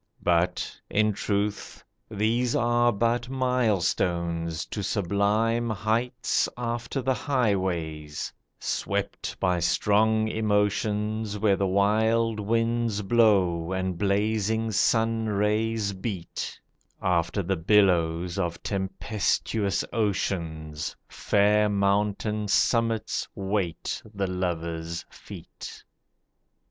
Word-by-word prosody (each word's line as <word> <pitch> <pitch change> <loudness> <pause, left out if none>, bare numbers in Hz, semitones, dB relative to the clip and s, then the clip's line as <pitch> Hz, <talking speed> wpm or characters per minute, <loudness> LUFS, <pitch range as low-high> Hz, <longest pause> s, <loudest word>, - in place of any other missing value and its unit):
But, 85 +1 0
in 105 0 +2
truth, 100 +1 -2 0.3
These 115 +3 0
are 120 0 +3
but 120 +3 0
milestones 90 -10 0
to 105 - -5
sublime 105 +4 +1
heights 110 +3 0
After 120 +2 -3
the 130 +1 +2
highways, 95 - -1 0.3
swept - - -3
by 90 -1 +1
strong 105 +6 +2
emotions, 105 0 0
Where 100 -1 +3
wild 110 +4 +2
winds 115 0 0
blow 95 -6 +3
and 95 -1 -1
blazing 110 +3 0
sun 115 +1 +2
rays 105 0 0
beat, 95 -3 -5 0.4
After 90 +2 0
the 95 +2 0
billows 90 -1 +2
of 85 -2 -2
tempestuous 100 +1 -1
oceans, 85 -8 -2
Fair 105 +1 +2
mountain 105 +1 0
summits 115 +1 +1
wait 95 -4 -2
the 100 0 0
lover's 85 -2 -3
feet. - - -10
105 Hz, 90 wpm, -26 LUFS, 95-110 Hz, 0.4 s, are